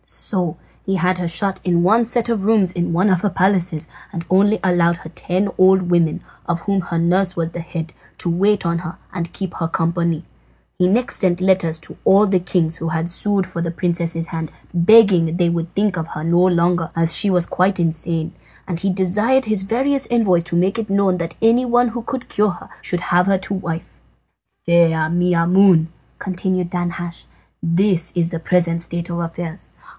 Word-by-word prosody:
So 180 -6 -3 0.3
he 195 - -1
had 185 0 0
her 175 - -2
shut 185 +4 -1
in 175 -2 +1
one 220 +6 +4
set 240 0 -1
of 230 -4 -1
rooms 205 -4 +3
in 175 -1 -2
one 185 +5 +2
of 185 -2 +2
her 205 - +1
palaces, 185 -4 0 0.2
and 170 -1 -6
only 205 +3 +3
allowed 175 -2 +2
her 160 - -11
ten 185 +5 -1
old 190 0 +5
women, 170 -3 +2 0.3
of 170 -1 -1
whom 195 +1 0
her 170 -1 -4
nurse 180 +3 +1
was 165 -1 -2
the 175 - -6
head, 165 -1 -6 0.2
to - - -3
wait 195 +3 +1
on 170 0 0
her 170 0 -7 0.2
and 170 -2 -4
keep 190 -3 -5
her 165 - -2
company. 170 0 -1 0.5
He 180 - +4
next 240 +8 0
sent 180 -3 +1
letters 185 -4 +1
to - - -10
all 200 +2 +5
the 190 -2 +2
kings 170 -2 -1
who 165 - -3
had 160 +1 -2
sued 195 +2 -1
for 185 -2 -6
the 170 - -2
princess's 170 -1 -2
hand, 160 -3 -5 0.2
begging 175 -3 +5
they 175 -2 +2
would 170 0 -3
think 205 -1 +1
of 160 0 -3
her 155 - -6
no 170 +2 +2
longer, 175 -2 +2
as 165 0 +2
she 205 - +4
was 180 -2 +2
quite 185 +2 0
insane, 165 0 -2 0.3
and 170 -3 -3
he 195 - -1
desired 210 +8 +1
his 215 -3 0
various 265 +7 0
envoys 205 -8 +2
to 170 - -3
make 190 +6 +1
it 220 -2 -4
known 195 -2 +1
that 165 -1 -4
anyone 245 +1 +3
who 235 +1 -5
could 255 +2 -5
cure 210 0 +1
her 175 - -8
should 175 - -2
have 180 +1 +1
her 195 -1 +3
to 190 +1 -4
wife. 170 -4 -5 0.7
"Fair 165 -2 +3
Maimoune," 175 0 +3 0.3
continued 185 -1 -2
Danhasch, 175 -1 -4 0.4
"this 175 0 +1
is 170 -1 0
the 165 - -3
present 170 0 +1
state 170 0 -4
of 170 - -3
affairs. 165 0 -5
180 Hz, 195 wpm, -19 LUFS, 170-195 Hz, 0.7 s, old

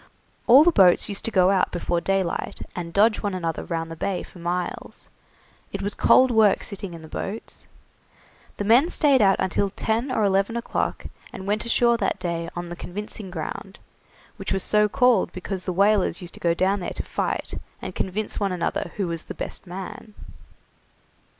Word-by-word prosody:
All 260 +5 +9
the 345 - +5
boats 190 - +5
used 200 - -4
to - - 0
go 185 -3 +4
out 190 -2 +2
before 175 0 -1
daylight, 195 -2 -1
and 170 -2 -5
dodge 210 +4 +3
one 200 -2 -2
another 165 -3 -3
round 165 -1 -4
the - - -5
Bay 185 +3 -2
for 180 - -14
miles. 175 +1 -4 0.6
It - - -4
was 205 +1 -1
cold 260 0 +5
work 220 -3 +4
sitting 195 -4 -6
in 165 - -11
the - - -10
boats. 205 +7 -6 0.9
The - - -2
men 240 - +5
stayed 280 -7 +3
out 195 -2 +5
until 190 +2 0
ten 225 +6 -1
or 220 - +1
eleven 200 +3 +1
o'clock, 235 - -2 0.3
and 190 - -8
went 210 +2 -1
ashore 235 0 +3
that - - -1
day 170 -2 -3
on 175 0 -5
the 175 - -6
Convincing 205 +3 -6
Ground, 185 +3 -6 0.6
which 195 - -5
was 190 -1 +1
so 210 0 +3
called 245 -2 +3
because 185 0 -4
the 185 - -1
whalers 200 -1 +2
used 175 -2 -9
to - - -10
go 170 -1 +1
down 195 +3 +1
there 175 - -5
to - - -3
fight, - - -3 0.3
and - - -6
convince 205 +3 -3
one 200 -2 0
another 175 -1 -2
who 195 -3 -1
was 165 -2 -4
the - - -7
best - - -6
man. 195 +4 -8
195 Hz, 190 wpm, -24 LUFS, 175-215 Hz, 0.9 s, All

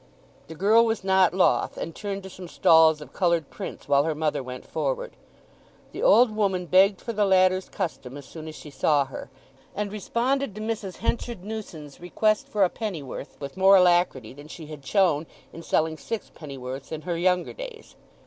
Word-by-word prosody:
The 160 - -9
girl 210 +7 +4
was 225 -3 -1
not 190 -2 +4
loth, 185 +1 +1
and 165 - -5
turned 200 +1 -5
to 190 - -8
some 185 0 -9
stalls 160 -3 +5
of 145 -3 -12
coloured 170 -5 0
prints - - -8
while 140 0 +4
her 160 0 -1
mother 150 -2 -1
went 125 0 -8
forward. - - -3 0.8
The - - -7
old 250 - +5
woman 190 -4 0
begged 190 +3 +4
for 230 - -5
the 210 -1 +1
latter's 185 -1 +3
custom 145 -8 -5
as 140 - -10
soon 160 +2 -10
as 155 - -8
she 150 - -11
saw 140 +1 +2
her, 135 -2 -9 0.5
and 205 0 -3
responded 235 +3 -1
to 215 - -6
Mrs. 215 -4 -4
Henchard 230 -3 -3
Newson's 185 -9 -8
request 215 +4 0
for 205 -2 +1
a 185 - +3
pennyworth 160 - -6
with 140 +1 -7
more 190 +1 +6
alacrity 175 - +3
than 145 +2 -13
she 160 0 -10
had 150 -2 -10
shown 165 -3 +2 0.3
in 165 - -9
selling 160 -1 0
six 225 -2 -5
pennyworths 135 -3 -8
in 155 -1 -5
her 175 +1 -3
younger 180 +1 +1
days. - - -10
180 Hz, 185 wpm, -25 LUFS, 155-210 Hz, 0.8 s, more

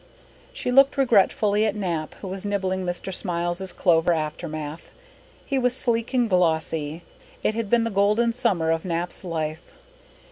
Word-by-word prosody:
She 250 - -3
looked 275 +2 +5
regretfully 210 -4 +3
at 210 - -1
Nap, 170 -6 -3
who 195 - -6
was 190 0 -5
nibbling 190 -2 -1
Mr. 175 +1 -3
Smiles's 175 +1 -2
clover 170 -1 +3
aftermath. 155 -1 -4 0.6
He 275 -1 0
was 250 -1 +1
sleek 230 -1 -1
and 245 -2 +3
glossy. 160 -3 0 0.4
It - - +2
had 225 -2 -3
been 235 0 +3
the 230 - -2
golden 210 +4 +2
summer 190 -10 +1
of 165 0 0
Nap's 175 0 -3
life. 160 -2 -4
185 Hz, 150 wpm, -24 LUFS, 165-220 Hz, 0.6 s, looked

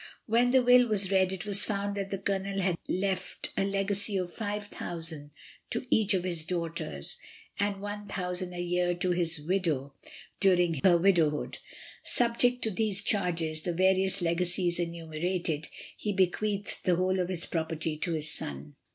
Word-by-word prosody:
When 235 +2 +3
the 260 0 +4
will 245 0 +6
was 200 -3 +2
read, 190 -1 +3
it 190 0 -5
was 205 -1 +2
found 200 -1 -2
that 195 -1 -3
the 195 - -2
Colonel 195 0 -2
had 185 -2 +1
left 190 0 -2
a - - +1
legacy 200 +1 0
of 180 -2 -3
5,000/. 175 -7 -4 0.4
to - - -3
each 210 -2 +3
of 180 - -1
his 170 -3 +1
daughters, 165 - -4 0.4
and 200 0 +1
1,000/. 195 -3 -4
a 175 - -3
year 175 0 0
to 180 +1 0
his 170 -2 0
widow 155 -5 -1 0.5
during 175 -6 +3
her 175 -2 +6
widowhood. 170 -5 +2 0.4
Subject 245 +1 +3
to 220 - +1
these 200 -1 +1
charges, 170 -6 0
and 170 -1 -2
various 190 0 +4
legacies 175 +1 +1
enumerated, 170 -1 -2 0.3
he 210 - -3
bequeathed 200 +2 0
the 180 - +3
whole 185 +2 +1
of 180 0 -1
his 180 -2 -1
property 160 -1 -2
to 170 +2 -2
his 155 -1 +2
son. 70 +1 -5
185 Hz, 160 wpm, -29 LUFS, 170-200 Hz, 0.5 s, will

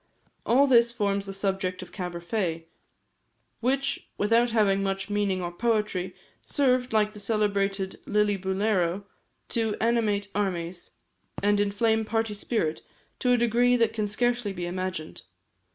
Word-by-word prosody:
All 265 +4 +5
this 235 -3 +5
forms 200 -3 -1
the - - -4
subject 190 -1 -2
of 180 - -13
"Caberfae," 175 -2 -3 0.9
which, 270 +3 0
without 230 +3 +3
having 205 -4 +2
much 195 +1 -2
meaning 200 -3 0
or 175 - -3
poetry, 210 -2 -1 0.3
served, 255 -3 +1
like 215 -1 +2
the 210 - -10
celebrated 200 -2 0
"Lillibulero," 200 -2 +1 0.5
to 225 -2 0
animate 215 -3 +1
armies, 180 -3 -3 0.5
and 205 0 +3
inflame 220 +2 +2
party 225 0 -1
spirit 200 -6 -1 0.4
to 250 -1 +3
a - - +4
degree 240 +1 +3
that 230 -2 +2
can 215 -2 -1
scarcely 240 0 0
be 175 -2 -4
imagined. 185 -2 -4
205 Hz, 130 wpm, -27 LUFS, 190-230 Hz, 0.9 s, All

